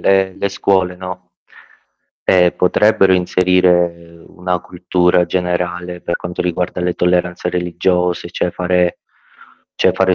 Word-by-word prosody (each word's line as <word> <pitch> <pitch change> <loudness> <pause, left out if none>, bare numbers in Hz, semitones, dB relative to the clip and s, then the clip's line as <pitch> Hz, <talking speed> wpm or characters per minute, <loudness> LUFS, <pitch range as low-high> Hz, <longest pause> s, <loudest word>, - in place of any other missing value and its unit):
le 95 -1 +2
le 100 - 0
scuole, 95 -2 0
no, 90 0 -8 0.9
ehm, 90 -1 +4
potrebbero 95 +1 +3
inserire 90 -2 +1
una 90 0 -3
cultura 90 0 +1
generale 90 0 -3
per 85 - -2
quanto 85 0 -5
riguarda 90 0 -2
le 90 0 -1
tolleranze 90 0 0
religiose, 90 0 -1
cioè 90 - -1
fare 90 0 0 0.8
cioè - - +3
fare 95 -1 +2
90 Hz, 120 wpm, -17 LUFS, -, 0.9 s, ehm